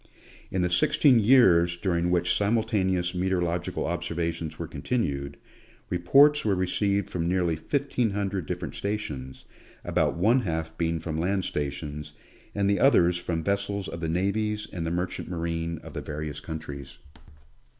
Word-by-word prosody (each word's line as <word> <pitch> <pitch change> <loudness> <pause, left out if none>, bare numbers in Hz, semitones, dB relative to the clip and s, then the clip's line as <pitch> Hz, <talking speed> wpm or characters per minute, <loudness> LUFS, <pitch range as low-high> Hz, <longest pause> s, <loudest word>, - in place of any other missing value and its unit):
In 95 -1 0
the 90 - +1
sixteen 120 - +4
years 95 -8 +5
during 85 -2 0
which 90 0 +2
simultaneous 100 -5 +1
meteorological 90 -2 -1
observations 85 -2 -3
were 85 - -4
continued, 70 - -2 0.5
reports 140 +12 +5
were 105 -3 +2
received 100 +2 0
from 85 -2 -2
nearly 90 -2 +1
fifteen 130 - -1
hundred 100 -4 -2
different - - -4
stations, 75 -11 -5 0.4
about - - +1
one 110 +9 +4
half 80 -5 -3
being 85 0 0
from 80 -1 -4
land 95 +2 0
stations, 75 +1 -4 0.4
and 100 -1 +1
the 100 0 +2
others 90 -10 +4
from 85 -2 -3
vessels 100 0 -1
of 85 - -6
the 80 - -1
navies 105 +4 -1
and 85 -3 -3
the - - 0
mer 90 +1 0
chant 90 - -7
marine 85 -1 -3
of - - -10
the - - -4
various 75 0 -5
countries. 75 -4 -7
90 Hz, 150 wpm, -27 LUFS, 80-100 Hz, 0.5 s, years